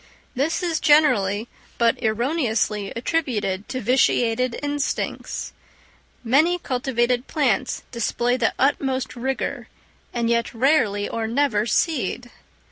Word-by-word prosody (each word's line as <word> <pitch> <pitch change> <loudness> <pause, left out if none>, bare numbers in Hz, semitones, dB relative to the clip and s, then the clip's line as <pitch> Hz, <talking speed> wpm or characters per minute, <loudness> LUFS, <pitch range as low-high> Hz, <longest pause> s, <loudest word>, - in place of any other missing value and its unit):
This 305 +8 0
is 330 -3 0
generally, 225 -9 +3 0.3
but 235 0 +2
erroneously 220 -3 0
attributed 230 -8 -2
to 255 - -3
vitiated 245 0 +2
instincts. 290 -1 -3 0.7
Many 300 +9 +3
cultivated 250 -4 -1
plants 260 -5 0
display 240 +1 0
the 240 -3 0
utmost 265 -1 0
vigour, 260 +2 -3 0.4
and 235 -1 -1
yet 235 0 0
rarely 225 -6 +2
or 225 -1 -3
never 230 -3 +1
seed! 245 - -1
245 Hz, 105 wpm, -23 LUFS, 225-280 Hz, 0.7 s, generally